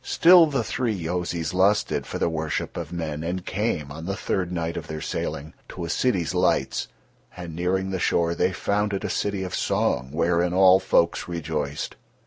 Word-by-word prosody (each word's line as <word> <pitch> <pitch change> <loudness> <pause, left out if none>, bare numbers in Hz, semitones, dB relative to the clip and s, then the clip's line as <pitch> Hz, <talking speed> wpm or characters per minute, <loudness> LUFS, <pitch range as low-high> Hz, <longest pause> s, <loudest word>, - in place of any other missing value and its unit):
Still 170 -1 +6
the 135 -5 -1
three 115 -1 -1
Yozis 85 -1 -2
lusted 100 +3 +2
for - - -4
the - - +1
worship 80 -2 -3
of - - -5
men, 80 -3 -4
and 90 +2 -3
came, 90 -9 -2
on 80 +3 -7
the 95 - -1
third 90 -3 -2
night 85 -1 -2
of - - -5
their 80 0 -5
sailing, 75 0 -4 0.2
to 90 - -5
a 85 - -3
city's 95 - 0
lights; - - +1 0.5
and 85 -3 -7
nearing 95 +2 -1
the 95 - -2
shore 85 0 +1
they 90 - +1
found 100 +4 -1
it 95 - -2
a - - -2
city 100 -2 -1
of 90 - -5
song 65 0 0
wherein 85 +2 +1
all 95 0 +7
folks 85 -3 +1
rejoiced. 75 -4 -4
90 Hz, 185 wpm, -24 LUFS, 80-95 Hz, 0.5 s, all